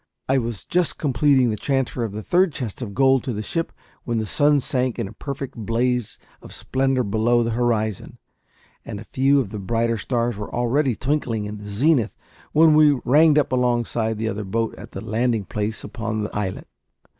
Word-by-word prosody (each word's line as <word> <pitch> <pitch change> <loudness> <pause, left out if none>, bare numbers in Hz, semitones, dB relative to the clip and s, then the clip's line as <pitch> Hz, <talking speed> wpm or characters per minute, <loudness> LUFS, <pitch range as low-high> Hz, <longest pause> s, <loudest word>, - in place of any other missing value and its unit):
I 135 0 +3
was 115 -4 -5
just 180 -1 0
completing 135 -3 +3
the - - -1
transfer 135 -1 -1
of 110 - -3
the 105 +1 -6
third 180 -2 +2
chest 120 -3 -5
of 100 -5 -6
gold 135 0 +4
to 125 - -2
the 105 0 -4
ship 165 +9 -2 0.3
when 120 -2 -2
the 110 - -1
sun 145 +6 +3
sank 130 -2 -1
in 115 -4 -2
a 100 - -11
perfect 140 +2 -6
blaze 120 +1 -1 0.2
of - - -11
splendour 130 -1 0
below 115 +3 +2
the 115 - -1
horizon, 110 -3 -1 0.7
and 100 - -7
a - - -8
few 135 +4 +2
of 115 -8 -2
the 105 - -5
brighter 115 +3 0
stars 120 0 -1
were 105 - -6
already 120 +2 +1
twinkling 125 -6 -1
in 105 0 -6
the 105 - -9
zenith 120 +4 +1 0.3
when 160 0 +6
we 150 -3 +5
ranged 150 +4 +5
up 150 - +2
alongside 120 -3 0
the 110 +1 -2
other 105 -1 -3
boat 115 +3 -1
at - - -12
the - - -6
landing 115 -1 0
place 105 +3 -3
upon 110 -2 -3
the 105 - -6
islet. 100 -3 -3
120 Hz, 195 wpm, -22 LUFS, 110-135 Hz, 0.7 s, when